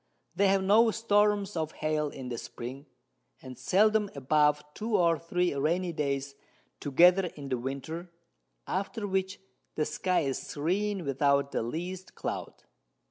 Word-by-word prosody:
They 200 Hz, -, +3 dB
have 195 Hz, 0 st, +3 dB
no 220 Hz, +4 st, +5 dB
Storms 210 Hz, -2 st, +2 dB
of 160 Hz, -1 st, -2 dB
Hail 155 Hz, -1 st, -1 dB
in 130 Hz, -3 st, -8 dB
the 120 Hz, -2 st, -4 dB
Spring, 130 Hz, +5 st, -8 dB, 0.5 s
and 130 Hz, -1 st, -10 dB
seldom 210 Hz, -, +3 dB
above 150 Hz, +2 st, +2 dB
2 220 Hz, +4 st, 0 dB
or 170 Hz, -2 st, +3 dB
3 175 Hz, +1 st, 0 dB
rainy 170 Hz, +5 st, 0 dB
Days 140 Hz, -2 st, -2 dB, 0.5 s
together 180 Hz, +6 st, +5 dB
in 140 Hz, -2 st, -8 dB
the 130 Hz, -2 st, -1 dB
Winter, 140 Hz, +7 st, -5 dB, 0.6 s
after 200 Hz, +3 st, -3 dB
which 190 Hz, 0 st, -1 dB, 0.4 s
the 155 Hz, -, +1 dB
Sky 175 Hz, +4 st, 0 dB
is 135 Hz, -3 st, -1 dB
serene 190 Hz, +5 st, -2 dB
without 140 Hz, 0 st, +2 dB
the -, -, -1 dB
least 175 Hz, +10 st, -5 dB
Cloud. -, -, -5 dB
165 Hz, 140 wpm, -29 LUFS, 140-190 Hz, 0.6 s, no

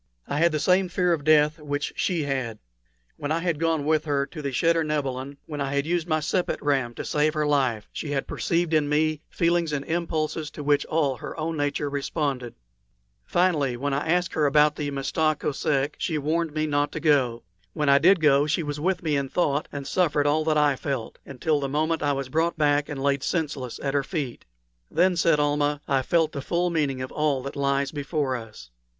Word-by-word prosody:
I 145 Hz, -, -1 dB
had 170 Hz, +1 st, +4 dB
the 155 Hz, -, -1 dB
same 180 Hz, +4 st, +3 dB
fear 180 Hz, -1 st, +1 dB
of 155 Hz, -3 st, -2 dB
death 155 Hz, +1 st, +4 dB
which 145 Hz, -1 st, -3 dB
she 170 Hz, -4 st, 0 dB
had. 130 Hz, -6 st, -2 dB, 0.6 s
When 145 Hz, +1 st, -4 dB
I 160 Hz, -, +2 dB
had 165 Hz, -3 st, -1 dB
gone 165 Hz, -3 st, 0 dB
with 155 Hz, 0 st, +2 dB
her 140 Hz, -2 st, +1 dB
to 155 Hz, +2 st, -9 dB
the 140 Hz, -, -2 dB
cheder 165 Hz, +6 st, +2 dB
nebilin, 140 Hz, -2 st, -3 dB
when 150 Hz, -2 st, -5 dB
I 140 Hz, 0 st, -2 dB
had 140 Hz, 0 st, +1 dB
used 170 Hz, 0 st, -1 dB
my 155 Hz, -2 st, +1 dB
sepet 175 Hz, +4 st, -1 dB
ram 135 Hz, -5 st, 0 dB
to -, -, -5 dB
save 150 Hz, +1 st, +1 dB
life, 140 Hz, -8 st, +1 dB
she 155 Hz, -, -5 dB
had 140 Hz, -2 st, -1 dB
perceived 170 Hz, -1 st, -1 dB
in 150 Hz, -2 st, +2 dB
me 155 Hz, 0 st, +1 dB
feelings 170 Hz, -1 st, +1 dB
and 140 Hz, -1 st, -2 dB
impulses 160 Hz, -2 st, -2 dB
to 150 Hz, -, -7 dB
which 145 Hz, 0 st, +2 dB
all 145 Hz, -5 st, +1 dB
her 160 Hz, -, -7 dB
own 160 Hz, +1 st, -2 dB
nature 145 Hz, 0 st, -1 dB
responded. 140 Hz, -3 st, -2 dB, 0.7 s
Finally, 150 Hz, -, +1 dB
when 140 Hz, +2 st, -2 dB
I 145 Hz, +3 st, -1 dB
asked 180 Hz, +1 st, +1 dB
about 150 Hz, 0 st, +4 dB
the 145 Hz, -2 st, -3 dB
Mista 150 Hz, +2 st, 0 dB
Kosek, 140 Hz, 0 st, 0 dB
she 160 Hz, -, -1 dB
warned 160 Hz, +2 st, 0 dB
me 155 Hz, 0 st, +1 dB
not 145 Hz, -1 st, 0 dB
to -, -, -3 dB
go. 130 Hz, -7 st, +2 dB, 0.3 s
When 150 Hz, -, -1 dB
I 140 Hz, 0 st, +6 dB
did 185 Hz, +4 st, +5 dB
go 145 Hz, -1 st, +4 dB
she 165 Hz, +2 st, 0 dB
was 145 Hz, -1 st, -4 dB
with 180 Hz, +3 st, 0 dB
me 155 Hz, -3 st, +1 dB
in 140 Hz, -1 st, -1 dB
thought 150 Hz, -3 st, 0 dB
and 140 Hz, -1 st, -6 dB
suffered 150 Hz, -5 st, +1 dB
all 150 Hz, +2 st, +2 dB
that 155 Hz, -1 st, +2 dB
I 145 Hz, -2 st, +3 dB
felt, 130 Hz, -3 st, -4 dB
until 145 Hz, +3 st, 0 dB
the 140 Hz, -1 st, -2 dB
moment 155 Hz, +3 st, 0 dB
when 145 Hz, -, +1 dB
I -, -, +2 dB
was 135 Hz, -1 st, -3 dB
brought 165 Hz, +5 st, 0 dB
back 145 Hz, -1 st, +2 dB
and 135 Hz, -2 st, -4 dB
laid 140 Hz, -1 st, +1 dB
senseless 145 Hz, -6 st, -3 dB
at 135 Hz, -1 st, -1 dB
her 140 Hz, -, +2 dB
feet. 140 Hz, -5 st, -4 dB, 0.4 s
"Then," 180 Hz, +3 st, +3 dB
said 165 Hz, -3 st, +3 dB
Almah, 145 Hz, 0 st, +1 dB
"I 135 Hz, -1 st, +2 dB
felt 160 Hz, +3 st, +1 dB
the 140 Hz, -, -5 dB
full 175 Hz, +4 st, 0 dB
meaning 140 Hz, -5 st, 0 dB
of 130 Hz, -, -7 dB
all 145 Hz, -4 st, 0 dB
that 140 Hz, -, -6 dB
lies 140 Hz, 0 st, 0 dB
before 145 Hz, -2 st, -2 dB
us." 110 Hz, -, -9 dB
150 Hz, 215 wpm, -25 LUFS, 140-160 Hz, 0.7 s, I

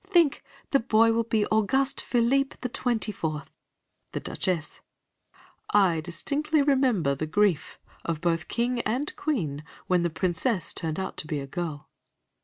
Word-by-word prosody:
Think, 345 Hz, -7 st, +3 dB, 0.3 s
the 275 Hz, -, +5 dB
boy 225 Hz, -1 st, +4 dB
will 230 Hz, 0 st, +1 dB
be 215 Hz, -2 st, +1 dB
Auguste 265 Hz, +6 st, +2 dB
Philippe 260 Hz, +3 st, +1 dB
the 250 Hz, -, -2 dB
Twenty 235 Hz, -3 st, 0 dB
fourth! 155 Hz, -6 st, -4 dB, 0.6 s
The -, -, -1 dB
Duchess: 170 Hz, -5 st, -3 dB, 0.9 s
I 185 Hz, -6 st, +4 dB
distinctly 285 Hz, -, 0 dB
remember 255 Hz, -, +3 dB
the 155 Hz, +3 st, -3 dB
grief 190 Hz, -1 st, +1 dB, 0.3 s
of 165 Hz, -2 st, -2 dB
both 170 Hz, 0 st, +1 dB
the 160 Hz, -, -11 dB
King 240 Hz, +1 st, 0 dB
and 250 Hz, +8 st, -1 dB
Queen 160 Hz, -, -2 dB, 0.2 s
when 180 Hz, -1 st, +2 dB
the 170 Hz, -, +1 dB
Princess 175 Hz, +3 st, 0 dB
turned 160 Hz, +1 st, -2 dB
out 190 Hz, -, -4 dB
to 155 Hz, -, -4 dB
be 150 Hz, -2 st, -2 dB
a 140 Hz, -, -5 dB
girl. 150 Hz, 0 st, -5 dB
205 Hz, 155 wpm, -27 LUFS, 165-250 Hz, 0.9 s, the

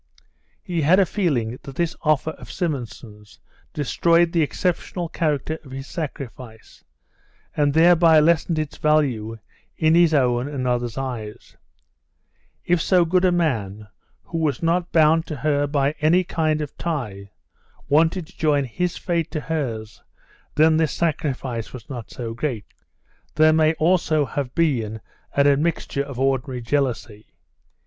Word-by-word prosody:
He 170 Hz, -2 st, -2 dB
had 170 Hz, +6 st, +4 dB
a 195 Hz, -, +5 dB
feeling 130 Hz, -, -1 dB
that 135 Hz, -, -10 dB
this 170 Hz, +1 st, -1 dB
offer 155 Hz, 0 st, +1 dB
of -, -, -12 dB
Simonson's 115 Hz, -, -6 dB, 0.3 s
destroyed 170 Hz, +3 st, +2 dB
the 170 Hz, -, +2 dB
exceptional 175 Hz, +2 st, -2 dB
character 155 Hz, -1 st, -2 dB
of 140 Hz, -, -14 dB
his 135 Hz, +1 st, -7 dB
sacrifice, 130 Hz, -8 st, -8 dB, 0.7 s
and 145 Hz, -1 st, +2 dB
thereby 165 Hz, -1 st, +6 dB
lessened 165 Hz, +1 st, +2 dB
its 155 Hz, -2 st, -3 dB
value 130 Hz, -8 st, +1 dB, 0.4 s
in 160 Hz, -1 st, +3 dB
his 170 Hz, -1 st, +5 dB
own 125 Hz, -3 st, +2 dB
and 140 Hz, -3 st, -4 dB
others' 120 Hz, -1 st, -1 dB
eyes; 120 Hz, -6 st, -6 dB, 1.1 s
if 175 Hz, -1 st, +2 dB
so 180 Hz, -1 st, +3 dB
good 180 Hz, +2 st, +2 dB
a 185 Hz, -, +4 dB
man 110 Hz, -, -1 dB, 0.3 s
who 165 Hz, -, -5 dB
was 150 Hz, -3 st, -1 dB
not 170 Hz, +1 st, 0 dB
bound 160 Hz, 0 st, +4 dB
to 155 Hz, -, -4 dB
her 145 Hz, 0 st, 0 dB
by 140 Hz, -1 st, +1 dB
any 170 Hz, +4 st, +4 dB
kind 155 Hz, -3 st, -1 dB
of 150 Hz, -, -6 dB
tie 110 Hz, -12 st, -4 dB, 0.6 s
wanted 160 Hz, +4 st, +2 dB
to -, -, -21 dB
join 150 Hz, -3 st, +2 dB
his 175 Hz, +8 st, -3 dB
fate 170 Hz, -2 st, -1 dB
to 155 Hz, -, -3 dB
hers, 125 Hz, -9 st, -4 dB, 0.5 s
then 155 Hz, +1 st, +4 dB
this 160 Hz, -2 st, +1 dB
sacrifice 135 Hz, -8 st, -2 dB
was 120 Hz, -3 st, -10 dB
not 120 Hz, -4 st, -7 dB
so 115 Hz, -2 st, -6 dB
great. 120 Hz, -3 st, -3 dB, 0.7 s
There 155 Hz, 0 st, +5 dB
may 155 Hz, 0 st, +4 dB
have 160 Hz, -, 0 dB
also 155 Hz, -5 st, +1 dB
been 115 Hz, -10 st, 0 dB, 0.4 s
an 140 Hz, -, +4 dB
admixture 145 Hz, 0 st, +1 dB
of 140 Hz, -3 st, -6 dB
ordinary 130 Hz, -1 st, -1 dB
jealousy. 120 Hz, -4 st, -2 dB
150 Hz, 145 wpm, -22 LUFS, 125-165 Hz, 1.1 s, thereby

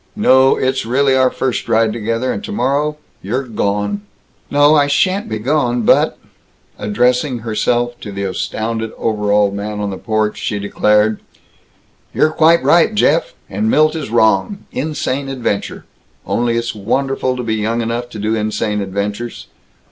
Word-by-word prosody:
No, 135 Hz, -10 st, +4 dB
it's 130 Hz, 0 st, 0 dB
really 130 Hz, +3 st, +2 dB
our 130 Hz, -1 st, +4 dB
first 130 Hz, -1 st, -3 dB
ride 110 Hz, -1 st, +2 dB
together, 115 Hz, +3 st, -2 dB
and -, -, -6 dB
tomorrow 150 Hz, -, -1 dB, 0.2 s
you're 120 Hz, +8 st, -2 dB
gone." 105 Hz, -, -2 dB, 0.5 s
"No, 145 Hz, +1 st, +4 dB
I 145 Hz, -2 st, +4 dB
sha'n't 185 Hz, +7 st, +1 dB
be 110 Hz, -, -2 dB
gone, 125 Hz, 0 st, 0 dB
but -, -, +3 dB, 0.3 s
" -, -, -37 dB
Addressing 125 Hz, +4 st, +1 dB
herself 120 Hz, +2 st, 0 dB
to 105 Hz, -, -8 dB
the 100 Hz, 0 st, -4 dB
astounded 110 Hz, +4 st, -3 dB
overalled 105 Hz, -2 st, +1 dB
man 105 Hz, +1 st, -4 dB
on 100 Hz, -1 st, -2 dB
the 95 Hz, -, -6 dB
porch, 110 Hz, -2 st, -1 dB
she 105 Hz, -, -2 dB
declared, 105 Hz, +1 st, +1 dB, 1.0 s
"You're 155 Hz, -, +3 dB
quite 165 Hz, +2 st, +4 dB
right, 175 Hz, +5 st, +4 dB
Jeff. 165 Hz, -5 st, +2 dB
And 105 Hz, +3 st, -1 dB
Milt 155 Hz, +5 st, +3 dB
is 155 Hz, -7 st, -4 dB
wrong. 110 Hz, -, +1 dB
Insane 140 Hz, -1 st, -3 dB
adventure. 120 Hz, -6 st, -3 dB, 0.4 s
Only, 120 Hz, -1 st, 0 dB
it's 115 Hz, 0 st, -2 dB
wonderful 130 Hz, +4 st, -1 dB
to 125 Hz, -, -3 dB
be 115 Hz, -1 st, -1 dB
young 115 Hz, +2 st, -1 dB
enough 120 Hz, +1 st, -3 dB
to 110 Hz, -, -9 dB
do 105 Hz, +1 st, -1 dB
insane 105 Hz, -1 st, -1 dB
adventures. 100 Hz, +4 st, -4 dB
115 Hz, 155 wpm, -17 LUFS, 105-135 Hz, 1.0 s, No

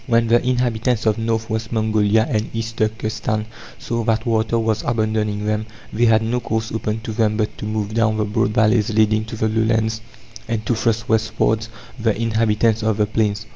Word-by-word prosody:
When 115 Hz, -2 st, +2 dB
the 120 Hz, +1 st, +4 dB
inhabitants 125 Hz, -2 st, 0 dB
of 110 Hz, 0 st, +2 dB
North 115 Hz, 0 st, -1 dB
West 110 Hz, 0 st, -3 dB
Mongolia 110 Hz, -1 st, +2 dB
and 110 Hz, -6 st, -1 dB
East 115 Hz, 0 st, -4 dB
Turkestan 110 Hz, 0 st, -1 dB, 0.3 s
saw 115 Hz, -1 st, -3 dB
that 115 Hz, +1 st, +1 dB
water 115 Hz, 0 st, +1 dB
was 110 Hz, -2 st, 0 dB
abandoning 110 Hz, -2 st, -1 dB
them, 110 Hz, +1 st, -1 dB, 0.3 s
they 120 Hz, +2 st, +2 dB
had 110 Hz, -1 st, +4 dB
no 120 Hz, +2 st, 0 dB
course 110 Hz, -1 st, -3 dB
open 110 Hz, 0 st, -2 dB
to 110 Hz, -, -5 dB
them 110 Hz, -1 st, +1 dB
but 110 Hz, -1 st, -1 dB
to -, -, -5 dB
move 110 Hz, -1 st, -2 dB
down 110 Hz, -1 st, +2 dB
the 105 Hz, -, +1 dB
broad 105 Hz, -1 st, 0 dB
valleys 110 Hz, -1 st, +2 dB
leading 110 Hz, 0 st, +2 dB
to 115 Hz, -, -7 dB
the 110 Hz, 0 st, 0 dB
lowlands, 110 Hz, 0 st, 0 dB, 0.5 s
and 115 Hz, -2 st, -2 dB
to -, -, +1 dB
thrust 115 Hz, -1 st, 0 dB
westwards 110 Hz, 0 st, +1 dB, 0.3 s
the 110 Hz, -1 st, 0 dB
inhabitants 115 Hz, 0 st, +1 dB
of 110 Hz, -1 st, 0 dB
the 105 Hz, -, +3 dB
plains. 105 Hz, -1 st, -1 dB
110 Hz, 190 wpm, -20 LUFS, 110-115 Hz, 0.5 s, the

